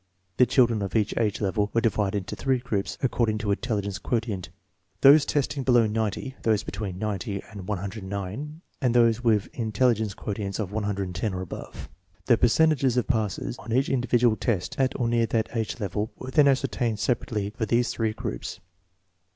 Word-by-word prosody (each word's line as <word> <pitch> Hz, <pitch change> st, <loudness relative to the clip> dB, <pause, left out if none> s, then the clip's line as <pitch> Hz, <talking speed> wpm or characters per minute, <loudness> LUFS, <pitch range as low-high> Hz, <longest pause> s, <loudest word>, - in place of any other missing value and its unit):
(The 125 Hz, -, +5 dB
children 120 Hz, -5 st, +3 dB
of 100 Hz, 0 st, -4 dB
each 110 Hz, -2 st, +1 dB
age 110 Hz, -3 st, 0 dB
level 105 Hz, +1 st, 0 dB
were -, -, +5 dB
di 115 Hz, -, +4 dB
vided 105 Hz, -1 st, -1 dB
into 100 Hz, -2 st, -3 dB
three 135 Hz, -1 st, +1 dB
groups 105 Hz, -5 st, -3 dB
according 115 Hz, -4 st, +1 dB
to 105 Hz, -1 st, -3 dB
intelli 105 Hz, +1 st, 0 dB
gence 100 Hz, 0 st, -5 dB
quotient, 110 Hz, -8 st, -2 dB, 0.5 s
those 145 Hz, +2 st, +8 dB
testing 140 Hz, -1 st, 0 dB
below 120 Hz, -3 st, +4 dB
90, 110 Hz, +5 st, -2 dB
those 110 Hz, -2 st, +2 dB
between 100 Hz, -3 st, -5 dB
90 100 Hz, -1 st, -3 dB
and 100 Hz, -3 st, -9 dB
109, 100 Hz, -, -5 dB, 0.2 s
and 125 Hz, -3 st, +1 dB
those 115 Hz, 0 st, +4 dB
with 110 Hz, -4 st, +3 dB
an -, -, -5 dB
in 110 Hz, -1 st, -2 dB
telligence 110 Hz, -4 st, +2 dB
quotient 100 Hz, -1 st, -4 dB
of 100 Hz, -4 st, -3 dB
110 100 Hz, -2 st, -2 dB
or 90 Hz, -, -3 dB
above. 95 Hz, -, -8 dB, 0.4 s
The 120 Hz, -, +5 dB
per 120 Hz, -, +3 dB
centages 135 Hz, -2 st, +3 dB
of 125 Hz, -, +2 dB
passes 110 Hz, -1 st, -2 dB
on 115 Hz, -, -8 dB
each 130 Hz, +4 st, +2 dB
individual 120 Hz, -3 st, +2 dB
test 100 Hz, -7 st, -1 dB
at 130 Hz, 0 st, +1 dB
or 120 Hz, -, +1 dB
near 115 Hz, -1 st, +2 dB
that 115 Hz, +1 st, -1 dB
age 110 Hz, 0 st, -2 dB
level 105 Hz, +1 st, -2 dB
were 130 Hz, -, -7 dB
then 145 Hz, +1 st, +5 dB
ascertained 125 Hz, -4 st, +1 dB
separately 105 Hz, -3 st, -1 dB
for 110 Hz, +1 st, -3 dB
these 120 Hz, +3 st, +2 dB
three 110 Hz, -2 st, -1 dB
groups. 75 Hz, -, -5 dB
110 Hz, 185 wpm, -26 LUFS, 100-120 Hz, 0.5 s, those